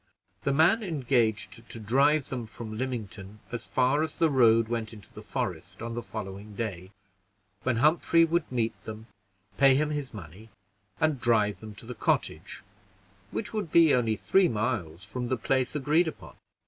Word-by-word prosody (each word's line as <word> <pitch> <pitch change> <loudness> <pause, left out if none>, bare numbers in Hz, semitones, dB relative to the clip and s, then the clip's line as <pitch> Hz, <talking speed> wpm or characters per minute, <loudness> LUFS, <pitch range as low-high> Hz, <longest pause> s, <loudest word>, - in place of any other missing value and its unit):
The 140 - 0
man 165 +10 +4
engaged 120 - 0
to 115 - -6
drive 140 +6 +2
them 125 -4 -4
from 110 -1 -8
Lymington 110 -5 -5
as 120 -1 -5
far 130 +3 +2
as 160 0 -2
the 165 -2 +3
road 115 -4 +5
went 115 -1 -3
into 105 -4 -14
the - - -9
forest, - - -4
on 115 0 -4
the 120 - -3
following 105 -1 -7
day, 95 -5 -4 0.7
when 130 -2 0
Humphrey 165 +5 +4
would 165 -2 -1
meet 115 -3 -2
them, 110 0 -7 0.5
pay 135 -1 +6
him 150 +2 +1
his 145 -3 -3
money, 100 +3 -11 0.5
and 155 -5 +1
drive 105 -5 +2
them 110 0 -10
to - - -11
the 125 - -6
cottage, - - -1 0.7
which 215 - -4
would 205 -7 -3
be 165 -3 +6
only 115 -3 +2
three 190 - +3
miles 105 -7 -2
from 125 +4 -5
the 130 - +1
place 130 +4 0
agreed 150 +4 +2
upon. 160 - -8
120 Hz, 170 wpm, -28 LUFS, 110-145 Hz, 0.7 s, pay